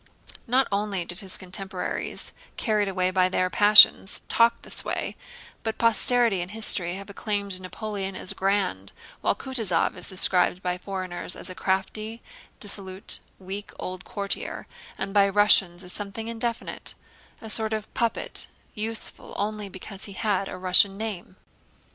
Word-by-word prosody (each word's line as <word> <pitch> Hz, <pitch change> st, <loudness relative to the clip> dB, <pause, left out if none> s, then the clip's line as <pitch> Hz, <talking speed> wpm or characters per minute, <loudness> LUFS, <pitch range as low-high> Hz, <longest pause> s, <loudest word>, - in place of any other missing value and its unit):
Not 255 Hz, +2 st, +3 dB
only 200 Hz, -3 st, -1 dB
did 175 Hz, +1 st, -5 dB
his 190 Hz, -2 st, -2 dB
contemporaries, 190 Hz, 0 st, -4 dB, 0.3 s
carried 210 Hz, -3 st, +1 dB
away 185 Hz, -1 st, 0 dB
by 185 Hz, -1 st, +3 dB
their 185 Hz, 0 st, 0 dB
passions, 205 Hz, -1 st, +7 dB
talk 235 Hz, 0 st, +4 dB
in -, -, -30 dB
this -, -, -2 dB
way, -, -, -3 dB, 0.5 s
but 220 Hz, -1 st, -3 dB
posterity 230 Hz, -3 st, +4 dB
and 175 Hz, -, -5 dB
history 190 Hz, -5 st, +3 dB
have 200 Hz, +1 st, -7 dB
acclaimed 200 Hz, -2 st, -2 dB
Napoleon 195 Hz, 0 st, -5 dB
as -, -, 0 dB
grand, 190 Hz, -, -1 dB, 0.3 s
while -, -, +1 dB
Kutúzov 225 Hz, -10 st, 0 dB
is -, -, 0 dB
described 185 Hz, -1 st, +3 dB
by 180 Hz, 0 st, -1 dB
foreigners 185 Hz, -2 st, -4 dB
as -, -, -6 dB
a -, -, -6 dB
crafty, 200 Hz, +5 st, -2 dB, 0.4 s
dissolute, 195 Hz, -2 st, -2 dB, 0.2 s
weak 195 Hz, +2 st, -7 dB
old 185 Hz, 0 st, -6 dB
courtier, 200 Hz, -1 st, -4 dB, 0.3 s
and 195 Hz, 0 st, -4 dB
by 200 Hz, -1 st, +5 dB
Russians 195 Hz, -3 st, +4 dB
as 180 Hz, -, -2 dB
something 205 Hz, +2 st, -5 dB
indefinite—a 230 Hz, -1 st, -6 dB
sort 220 Hz, 0 st, +2 dB
of 215 Hz, -1 st, -4 dB
puppet 235 Hz, -1 st, -1 dB, 0.3 s
useful 220 Hz, +1 st, -5 dB
only 210 Hz, 0 st, -3 dB
because 195 Hz, +1 st, -7 dB
he 200 Hz, -, -8 dB
had 195 Hz, -1 st, -1 dB
a -, -, -6 dB
Russian 185 Hz, +2 st, +4 dB
name. 205 Hz, -4 st, -6 dB
200 Hz, 145 wpm, -26 LUFS, 185-215 Hz, 0.5 s, passions